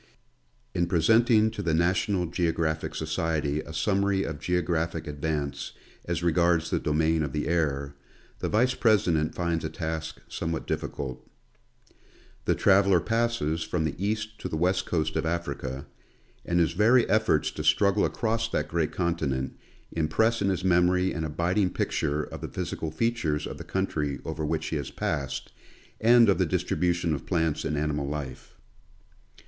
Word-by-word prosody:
In 85 - +1
presenting 110 +5 +4
to 105 - -5
the 85 -5 +1
National 90 +2 +1
Geographic 80 -2 -1
Society 80 -2 -1
a 75 - -10
summary 95 +4 +1
of 80 -3 -5
geographic 85 -2 -1
advance 75 -1 -3 0.3
as 85 -1 -2
regards 85 -1 +2
the - - +1
domain 80 +1 +1
of 75 -3 -2
the 75 - -1
air, 70 -4 0 0.5
the - - -2
Vice 125 +4 +3
president 90 -11 +2
finds 85 -2 -1
a 80 - -2
task 80 -1 -4
somewhat 80 -1 -3
difficult. 65 -2 -4 1.2
The - - +2
traveler 100 -2 +4
passes 115 -8 0
from 80 +1 -1
the 75 -3 -1
east 110 +1 -2
to 95 - -4
the 80 - -2
west 95 +3 +1
coast 80 -2 -1
of - - 0
Africa, 70 -5 -3 0.6
and 85 0 +1
his 85 -2 +3
very 115 +7 +4
efforts 110 -7 +2
to - - -5
struggle 100 0 +3
across 115 0 0
that - - -1
great 85 -2 0
continent, 75 -7 -1 0.4
impress 110 +9 +1
in 100 - +2
his 95 -1 -1
memory 90 0 +3
an 80 - -3
abiding 90 +5 +1
picture 75 0 -1
of - - -8
the - - -4
physical 80 - -4
features 80 -6 -1
of - - -7
the - - -6
country 75 -7 -2
over 80 -1 -4
which 80 +1 -1
he 80 - -1
has 70 - -4
passed, 70 -2 -3 0.5
and 115 +1 +6
of 100 - +3
the 95 - +3
distribution 90 -1 0
of 70 - -5
plants 80 -4 0
and 75 - -1
animal 75 -1 -1
life. 70 -2 -6
85 Hz, 155 wpm, -27 LUFS, 75-95 Hz, 1.2 s, and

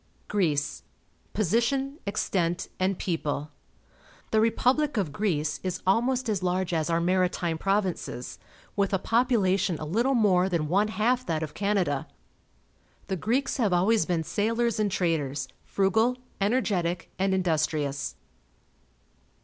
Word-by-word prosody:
GREECE 155 -8 0
(r - - -36 0.4
y^ - - -38
Position, 250 - 0
Extent, 175 -4 -1
and 185 0 +1
People. 150 -4 -2 0.4
— - - -28
The 220 - +4
re 225 - +5
public 270 +4 +1
of 185 -8 0
Greece 150 -4 -1
is 185 -1 -4
almost 245 +6 +2
as 205 -4 0
large 180 0 0
as 160 0 0
our 165 0 +2
Maritime 175 -2 +1
Provinces, 195 -10 -2 0.4
with 200 -1 +1
a - - +3
population 200 -6 +2
a 155 - -5
little 235 - +1
more 190 -5 +3
than 165 -4 0
one 200 +6 +2
half 230 +5 +1
that 160 -1 -1
of 155 - -5
Canada. 195 -9 0 1.0
The 190 - 0
Greeks 235 +10 0
have 215 -8 +2
always 190 +1 +3
been 170 -2 0
sailors 230 +5 0
and 210 -1 +2
traders, 145 -7 -1 0.2
frugal, 220 +6 +2 0.2
energetic, 195 -6 0
and 190 0 +2
industrious. 155 -5 0
190 Hz, 140 wpm, -27 LUFS, 165-220 Hz, 1.0 s, re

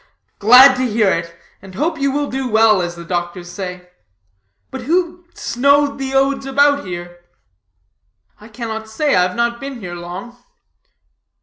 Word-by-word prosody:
"Glad 255 +5 +8
to 255 - 0
hear 215 -3 +2
it, 170 0 -4 0.3
and 190 -1 -13
hope 315 - -2
you 275 0 +1
will 290 +1 -1
do 265 -1 -3
well, 220 -3 +4
as 175 0 -4
the 170 0 -10
doctors 175 0 -4
say. 180 -1 -7 0.8
But 265 - -6
who 345 +5 -1
snowed 280 +3 +1
the 270 0 -4
odes 275 0 +1
about 285 -2 +2
here?" 175 0 -7 1.2
"I 210 - -14
cannot 220 -1 -6
say; 290 +6 0
I 180 - +4
have 180 0 -1
not 235 0 -1
been 275 -2 -7
here 180 -5 -7
long." 175 +7 -8
235 Hz, 160 wpm, -18 LUFS, 180-275 Hz, 1.2 s, Glad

